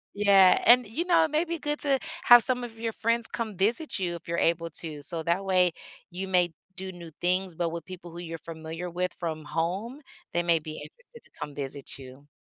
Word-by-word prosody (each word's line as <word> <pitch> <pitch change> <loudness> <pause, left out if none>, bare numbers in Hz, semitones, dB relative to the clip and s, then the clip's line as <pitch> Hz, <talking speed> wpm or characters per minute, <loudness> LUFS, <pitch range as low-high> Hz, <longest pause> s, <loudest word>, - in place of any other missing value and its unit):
Yeah, 195 -2 +6
and, 245 0 +7
you 300 +12 -3
know, 355 -2 +5
it 315 - -1
may 310 +2 +2
be 335 -1 -3
good 295 0 -3
to 275 -3 +3 0.3
have 240 -1 +9
some 250 0 0
of 225 -2 -8
your 225 0 -3
friends 230 +1 +1
come 220 -5 -4
visit 230 - +1
you, 180 -3 -1
if 170 - -11
you're 170 - -2
able 170 0 +1
to, 155 -3 -5
so, 160 +3 -1
that 170 +4 0
way, 185 -2 +3 0.4
you 190 +2 -5
may 175 -3 +2 0.2
do 190 0 -4
new 170 -2 -10
things, 180 0 0
but 170 0 -1
with 165 0 -6
people 180 -2 -10
who 170 - -9
you're 165 -1 -6
familiar 165 +2 -7
with 180 +1 -1
from 160 -3 -4
home, 190 - -3 0.3
they 175 - 0
may 170 -1 +3
be 155 0 -7
interested 485 - -12
to - - -20
come 145 - -6
visit 140 -1 -4
you. 135 +2 -13
180 Hz, 220 wpm, -27 LUFS, 165-230 Hz, 0.4 s, have